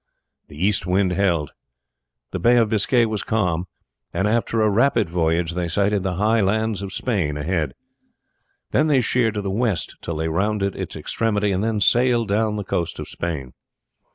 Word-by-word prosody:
The 75 - -13
east 95 +1 0
wind 95 +1 +2
held, 85 -5 0 0.8
the - - -3
Bay 120 +1 +4
of 115 -2 +3
Biscay 115 +3 +3
was 110 -3 -2
calm, 90 -5 -1 0.4
and 95 +4 0
after 115 +1 0
a 110 - +4
rapid 115 0 +3
voyage 85 0 +1
they 85 0 -2
sighted 100 +3 +1
the 95 -1 -2
high 110 +4 +2
lands 110 +1 0
of 100 -1 -5
Spain 95 - -1
ahead. 75 -3 -2 1.0
Then 155 - +3
they 140 -4 +4
sheered 115 -1 +1
to 105 - -2
the 100 - -2
west 110 -4 -1
till 85 - -4
they 80 +1 -2
rounded 100 +4 0
its - - -5
extremity 105 -3 -1
and 95 +1 0
then 110 -2 0
sailed 120 0 +3
down 105 +1 +1
the 105 - -3
coast 85 -3 -2
of - - -6
Spain. 75 -7 -4
100 Hz, 180 wpm, -22 LUFS, 85-110 Hz, 1.0 s, Bay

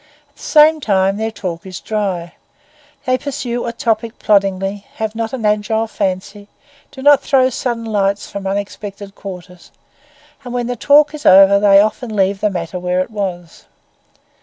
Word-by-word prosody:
At 285 - -37
the - - -18
same 310 +1 +5
time 195 -5 +1
their 220 +1 -2
talk 180 -6 -6
is 185 -2 -8
dry; 195 -6 -3 0.7
they 255 0 +1
pursue 245 -4 -4
a - - -2
topic 230 0 -2
ploddingly, 195 -1 0
have 220 -1 -3
not 225 0 -3
an 250 -5 -4
agile 210 +1 +1
fancy, 200 -1 -4 0.4
do 265 - -11
not 290 -1 +6
throw 260 -2 +2
sudden 235 -2 -3
lights 200 -2 -1
from 200 -1 -6
unexpected 200 0 -5
quarters, 180 -3 -10 0.7
and 245 -1 -7
when 245 -1 -1
the 245 +1 -3
talk 290 +5 +4
is 305 0 -8
over 195 +1 +7
they 200 -1 +6
often 215 +2 -1
leave 195 0 +1
the 210 - +2
matter 180 -1 -5
where 180 +1 0
it 185 - -5
was. 180 -5 -6
205 Hz, 165 wpm, -17 LUFS, 195-235 Hz, 0.7 s, over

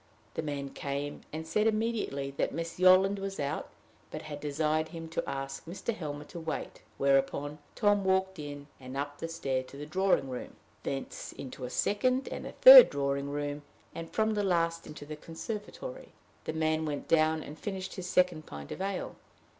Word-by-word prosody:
The - - -2
man 140 -3 -4
came, 140 +1 -4
and 160 +1 -5
said 210 +7 +2
immediately 215 -11 -1
that 140 - -1
Miss 165 +1 -4
Yolland 185 +2 +6
was 195 0 -4
out, 140 0 -2 0.4
but - - -6
had 145 -1 -6
desired 155 +2 0
him 165 0 -7
to 165 - -2
ask 135 0 -4
Mr. 195 +6 -3
Helmer 150 -6 -5
to 170 +3 -9
wait; 160 -1 -5 0.2
whereupon 140 +2 +1 0.2
Tom 205 -1 +3
walked 190 -1 +1
in, 145 -1 -6
and 130 0 -7
up 145 +1 -4
the 165 - -3
stair 135 -6 -1
to 130 +2 -12
the 145 - -6
drawing 185 -2 +2
room, 125 -1 -6 0.3
thence 135 -1 -5
into 130 -1 -7
a - - -5
second 255 - +1
and - - -5
a - - -8
third - - +11
drawing 140 0 -1
room, 145 0 -3 0.3
and 165 0 -6
from 220 0 +1
the 210 - +1
last 170 -3 +1
into 150 -1 -9
the 155 +1 -6
conservatory. 210 - -7 0.4
The - - -2
man 160 0 +1
went 145 -1 -4
down 160 -1 +3
and 150 +2 -10
finished 190 -2 -4
his 185 -2 -5
second, 180 -4 +2
pint 70 0 -8
of - - -5
ale. 195 -1 -3
155 Hz, 185 wpm, -31 LUFS, 145-190 Hz, 0.4 s, third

